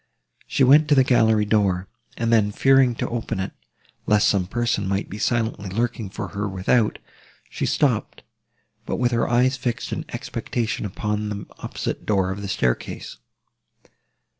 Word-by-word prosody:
She 135 - +1
went 145 +4 +6
to 150 - +4
the 135 - +6
gallery 110 -4 +3
door, 100 -3 +1 0.3
and 115 0 +1
then, 105 -2 +3
fearing 135 +1 +4
to - - -3
open 115 -4 -3
it, 95 +1 -3 0.6
lest 105 0 +4
some 95 -4 +1
person 115 -2 -1
might 100 +1 -2
be 105 - -6
silently 110 -4 -1
lurking 115 +1 -2
for - - -6
her 105 0 -3
without, 100 +4 +1 0.5
she - - -2
stopped, - - 0 0.6
but - - -1
with 125 -1 +1
her 115 -1 +1
eyes 125 +2 +3
fixed 125 -2 -3
in - - -4
expectation 115 -3 -3
upon 105 +2 -3
the 100 -1 -5
opposite - - -4
door 95 -3 +2
of 100 +2 -5
the 100 - -5
staircase. 65 -11 -2
105 Hz, 160 wpm, -23 LUFS, 100-120 Hz, 0.6 s, went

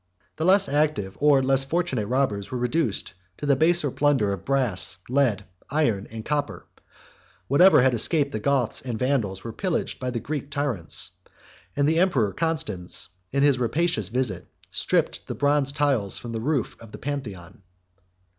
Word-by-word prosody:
The 160 - -1
less 195 +2 +5
active 145 -10 0
or 145 -2 +4
less 135 0 +2
fortunate 135 -7 -1
robbers 120 -6 0
were 130 - -3
reduced 125 -1 -1 0.2
to - - -5
the 140 -1 +4
baser 160 0 +2
plunder 135 -9 +2
of 95 - -7
brass, 125 -11 0
lead, 125 -6 +1 0.2
iron, 125 -9 0
and 110 0 -8
copper: 150 -1 -2 0.8
whatever 160 0 +6
had 130 -1 +4
escaped 140 +4 +1
the 110 - -3
Goths 130 0 0
and 120 -3 -4
Vandals 115 -7 -1
was 115 - -6
pillaged 185 -4 -2
by 130 - -2
the 120 -2 -2
Greek 140 +3 -5
tyrants; 105 - -2 0.6
and 145 0 +2
the 160 +2 +2
emperor 130 - +2
Constans, 110 - -2 0.2
in 140 +1 +1
his 140 -3 +4
rapacious 120 - 0
visit, 110 -7 -2 0.2
stripped - - 0
the - - -4
bronze 145 -1 +2
tiles 140 -9 +1
from 120 - -7
the 115 -1 -3
roof 140 -2 -1
of 115 -2 -13
the - - -8
Pantheon. 105 -11 -6
135 Hz, 165 wpm, -25 LUFS, 110-145 Hz, 0.8 s, whatever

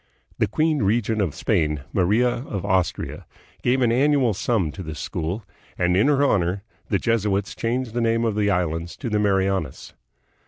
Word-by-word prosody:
The - - +3
queen 155 -2 +1
regent 110 +1 +1
of 90 -8 -1
Spain, 75 -3 0
Maria 105 +7 +3
of 120 -6 -3
Austria, 95 -1 -1 0.3
gave 130 +2 +2
an 115 - +3
annual 135 -2 +3
sum 95 -5 0
to 95 - -8
this 80 -4 -6
school, 90 - -4 0.3
and 90 0 +2
in 100 +9 +4
her 145 -1 +3
honor 95 -6 +1 0.3
the 100 - +2
Jesuits 105 -3 0
changed 120 0 -2
the 120 - -1
name 115 0 +1
of 115 - +1
the 105 -1 +1
islands 85 -3 -1
to 120 -5 -5
the 105 - +2
Marianas. 95 -7 0
105 Hz, 170 wpm, -23 LUFS, 90-120 Hz, 0.3 s, in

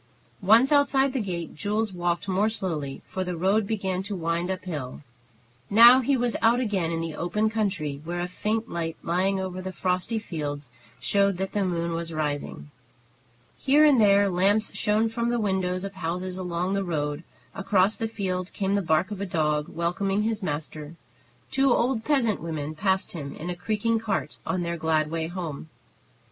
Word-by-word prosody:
Once 225 +8 +5
outside 275 -2 +3
the 265 - 0
gate, 175 -6 -4
Jules 210 +3 -1
walked 175 +2 -1
more 195 +3 +2
slowly, 160 -10 -3
for 190 - -3
the 180 -2 -4
road 195 +4 +2
began 190 -4 -1
to 200 +1 -5
wind 170 0 -1
up 190 -1 -3
hill. 145 -8 -5 0.7
Now 235 +4 +9
he 265 +1 +1
was 240 -1 0
out 230 +2 +4
again 200 -9 0
in 165 0 -2
the 165 -1 -4
open 210 +7 0
country, 185 -10 -2
where 175 +2 -4
a 175 - -1
faint 215 +5 -2
light 165 -1 -4
lying 190 +3 +1
over 185 -1 -4
the 190 0 -5
frosty 185 +5 -1
fields 145 - -5 0.3
showed 200 -2 +2
that 190 +1 -3
the 205 - 0
moon 170 -2 -1
was 165 0 -4
rising. 150 -1 -3 0.9
Here 290 +3 +5
and 280 -6 +5
there 200 -1 +5
lamps 195 +4 +2
shone 215 +2 +2
from 235 +1 -1
the 240 0 0
windows 190 -3 0
of 195 0 -5
houses 180 +1 -4
along 180 +1 -2
the 200 0 0
road; 150 -3 -2 0.3
across 195 +1 +2
the 225 - -2
field 185 -4 -3
came 195 0 -1
the 200 - +2
bark 165 +3 +1
of 200 -2 -5
a 200 - -2
dog, 150 -3 0
welcoming 195 +4 -1
his 220 0 -1
master; 150 -1 -5 0.6
two 270 -1 +3
old 240 -1 +1
peasant 245 -8 +1
women 155 -2 -4
passed 190 +4 0
him 140 -5 -6
in 175 +3 -5
a - - -4
creaking 220 +5 0
cart 215 -3 -3
on 185 -2 0
their 170 0 -2
glad 155 -1 +1
way 165 -1 -2
home. 165 -4 -6
185 Hz, 180 wpm, -26 LUFS, 170-215 Hz, 0.9 s, Now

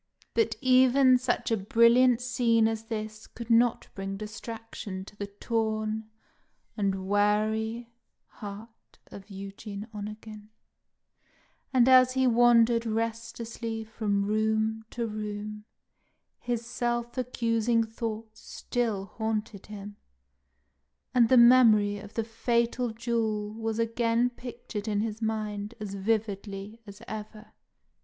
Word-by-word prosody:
But 450 -2 +1
even 255 0 +5
such 245 -1 -1
a 225 - +3
brilliant 235 +4 +4
scene 235 -3 +2
as 225 0 -3
this 215 -1 -6
could 235 0 -7
not 235 +1 +3
bring 195 0 -5
distraction 215 -2 -7
to 205 - -14
the 205 -1 -5
torn 220 +1 -2 0.7
and 195 -3 -1
weary 215 +3 +1 0.3
heart 215 +2 -11
of 200 +1 -11
Eugene 200 +1 -8
Onegin; 210 0 -8 1.2
and 255 -2 +4
as 255 -1 +7
he 260 0 +2
wandered 235 -1 +5
restlessly 230 0 -3
from 210 -2 -1
room 220 +1 0
to 235 - -3
room, 210 -1 -5 0.7
his 240 -1 -3
self 240 0 -2
accusing 230 -2 +1
thoughts 220 -1 -6
still 225 -6 -2
haunted 215 -1 -4
him, 205 -1 -9 1.2
and 240 -3 +4
the 260 - +6
memory 225 -4 +6
of 205 +1 -12
the 225 - 0
fatal 235 +2 0
duel 220 -2 -2
was 225 0 -3
again 230 +1 +1
pictured 235 -3 -7
in 205 -1 0
his 220 0 -4
mind 215 -1 -3
as 205 -2 -5
vividly 205 0 -3
as 200 0 -11
ever. 215 0 -8
220 Hz, 115 wpm, -28 LUFS, 210-235 Hz, 1.2 s, as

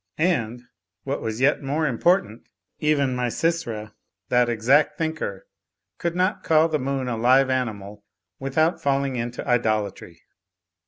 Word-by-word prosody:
And 125 -9 0 0.4
(what - - -3
was 110 +2 -4
yet 140 +3 +3
more 145 +3 -1
im 125 -6 -2
portant) 145 - +1 0.3
even 140 -4 +1
Misysra 125 -3 -2 0.4
(that 125 -1 +3
exact 125 +6 +3
thinker) 160 - -3 0.5
could 170 0 -2
not 185 +3 0
call 160 0 +4
the 155 -1 0
moon 135 -1 -2
a 120 - -1
live 130 +4 +4
animal 105 -5 -3 0.4
without 155 +5 0
falling 140 -2 0
into 120 +2 -4
idol 110 -4 +2
atry. 85 -2 -14
130 Hz, 140 wpm, -24 LUFS, 115-155 Hz, 0.5 s, call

